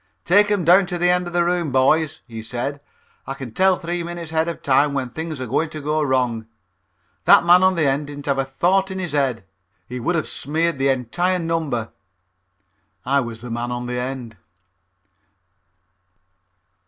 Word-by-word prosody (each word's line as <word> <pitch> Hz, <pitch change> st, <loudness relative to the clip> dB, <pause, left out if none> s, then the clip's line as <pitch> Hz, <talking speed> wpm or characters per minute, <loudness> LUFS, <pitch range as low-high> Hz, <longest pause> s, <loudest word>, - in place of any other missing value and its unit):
"Take 205 Hz, +4 st, +5 dB
'em 200 Hz, -5 st, 0 dB
down 180 Hz, +3 st, +6 dB
to 175 Hz, -1 st, -3 dB
the 175 Hz, +1 st, +3 dB
end 180 Hz, 0 st, 0 dB
of 175 Hz, -, -7 dB
the 175 Hz, -1 st, +2 dB
room, 175 Hz, -4 st, 0 dB
boys," 145 Hz, +4 st, +2 dB
he 115 Hz, -2 st, -8 dB
said. 125 Hz, +5 st, -4 dB, 0.5 s
"I 135 Hz, -, -4 dB
can 130 Hz, -5 st, -8 dB
tell 190 Hz, +3 st, +3 dB
three 175 Hz, -1 st, -3 dB
minutes 170 Hz, -1 st, -6 dB
ahead 160 Hz, 0 st, +1 dB
of 170 Hz, -, -5 dB
time 140 Hz, +1 st, +3 dB
when 130 Hz, -3 st, -2 dB
things 160 Hz, 0 st, -5 dB
are 130 Hz, -, -3 dB
going 140 Hz, +7 st, 0 dB
to 155 Hz, -, -7 dB
go 150 Hz, +1 st, -1 dB
wrong. 125 Hz, -5 st, 0 dB, 0.8 s
That -, -, +7 dB
man 175 Hz, +1 st, +7 dB
on 185 Hz, 0 st, +4 dB
the 160 Hz, -3 st, +1 dB
end 140 Hz, +2 st, 0 dB
didn't 145 Hz, -1 st, -8 dB
have 140 Hz, -1 st, 0 dB
a -, -, +2 dB
thought 180 Hz, +9 st, +1 dB
in 190 Hz, -, -5 dB
his 180 Hz, -3 st, -4 dB
head. 135 Hz, -7 st, 0 dB, 0.4 s
He 125 Hz, +1 st, -6 dB
would 170 Hz, +9 st, -1 dB
have 160 Hz, -, -1 dB
smeared 160 Hz, +2 st, -1 dB
the 135 Hz, +1 st, +2 dB
entire 175 Hz, +9 st, 0 dB
number." 160 Hz, -9 st, -2 dB, 1.1 s
I 140 Hz, +2 st, +2 dB
was 115 Hz, -3 st, -5 dB
the 120 Hz, -1 st, -8 dB
man 120 Hz, +1 st, -3 dB
on 120 Hz, 0 st, -4 dB
the 125 Hz, 0 st, -3 dB
end. 125 Hz, -4 st, -5 dB
145 Hz, 190 wpm, -21 LUFS, 130-175 Hz, 1.1 s, That